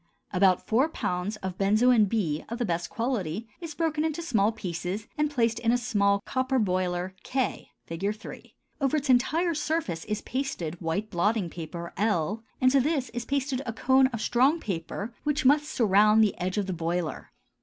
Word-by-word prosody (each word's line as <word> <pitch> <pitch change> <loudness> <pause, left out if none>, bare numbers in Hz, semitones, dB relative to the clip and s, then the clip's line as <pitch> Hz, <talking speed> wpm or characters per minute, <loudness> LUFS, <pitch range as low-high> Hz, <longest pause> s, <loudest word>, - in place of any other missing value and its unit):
_ - - -41 0.3
About 185 -1 +3
four 260 +8 +2
pounds 180 - -2
of 185 -1 -4
benzoin 215 +3 +4
B 170 -9 -1
of 235 - -4
best 170 -3 -2
quality 225 -4 -2
is 330 -4 -7
broken 315 -2 0
into 320 +1 -2
small 220 -9 +2
pieces 185 0 -4
and 300 0 +1
placed 230 -5 +1
in 230 -1 +2
a 245 - +3
small 200 -5 +1
copper 260 0 0
boiler 185 -3 0
K 260 -1 -2 0.2
(Fig. 180 +5 -2
3); 220 - -11 0.3
over 275 +2 +2
its 285 -2 +1
entire 325 +8 +2
surface 300 - -2
is 210 0 -3
pasted 190 - -3
white 180 +6 -2
blotting 195 0 0
paper 170 0 -7
L, 205 0 0 0.2
and 255 0 +4
to 275 - +5
this 275 -2 0
is 240 0 -5
pasted 275 -1 -1
a 230 - -2
cone 260 +3 +4
of 230 -4 -5
strong 265 +9 +3
paper 200 - -4
which 295 -1 0
must 290 +3 +5
surround 215 0 +4
the 210 - +1
edge 185 +2 -2
of 205 - +1
the 190 - -3
boiler. 170 -1 -3
220 Hz, 180 wpm, -27 LUFS, 185-265 Hz, 0.3 s, to